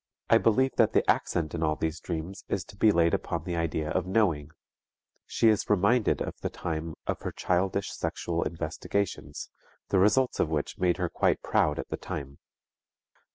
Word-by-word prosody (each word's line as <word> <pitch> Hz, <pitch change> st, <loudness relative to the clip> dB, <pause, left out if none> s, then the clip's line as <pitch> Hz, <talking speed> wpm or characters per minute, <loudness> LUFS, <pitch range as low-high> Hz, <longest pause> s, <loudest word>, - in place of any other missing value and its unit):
I -, -, +7 dB
believe 130 Hz, +4 st, +2 dB
that 115 Hz, -3 st, +4 dB
the -, -, +2 dB
accent 80 Hz, -3 st, +1 dB
in 85 Hz, -, -3 dB
all 75 Hz, -1 st, +2 dB
these 80 Hz, 0 st, -2 dB
dreams 85 Hz, +3 st, -5 dB
is 95 Hz, -, -1 dB
to -, -, -14 dB
be 110 Hz, +2 st, +4 dB
laid 85 Hz, -4 st, +3 dB
upon 85 Hz, -2 st, -2 dB
the 85 Hz, 0 st, -3 dB
idea 80 Hz, -2 st, -1 dB
of 95 Hz, -1 st, -1 dB
knowing. 90 Hz, -8 st, +1 dB, 0.8 s
She 115 Hz, -, +2 dB
is 105 Hz, -2 st, +1 dB
reminded 105 Hz, +4 st, +3 dB
of -, -, -5 dB
the -, -, -2 dB
time 80 Hz, 0 st, -4 dB
of -, -, -2 dB
her -, -, -3 dB
childish 95 Hz, +2 st, 0 dB
sexual 85 Hz, -1 st, -2 dB
investigations, 80 Hz, -1 st, -3 dB, 0.4 s
the 95 Hz, -, +3 dB
results 125 Hz, +7 st, +3 dB
of 80 Hz, -, +2 dB
which 75 Hz, -2 st, -2 dB
made 90 Hz, -1 st, +2 dB
her 90 Hz, -2 st, 0 dB
quite -, -, +1 dB
proud 75 Hz, -1 st, +2 dB
at -, -, -5 dB
the -, -, -3 dB
time. 70 Hz, 0 st, -6 dB
85 Hz, 180 wpm, -28 LUFS, 80-100 Hz, 0.8 s, I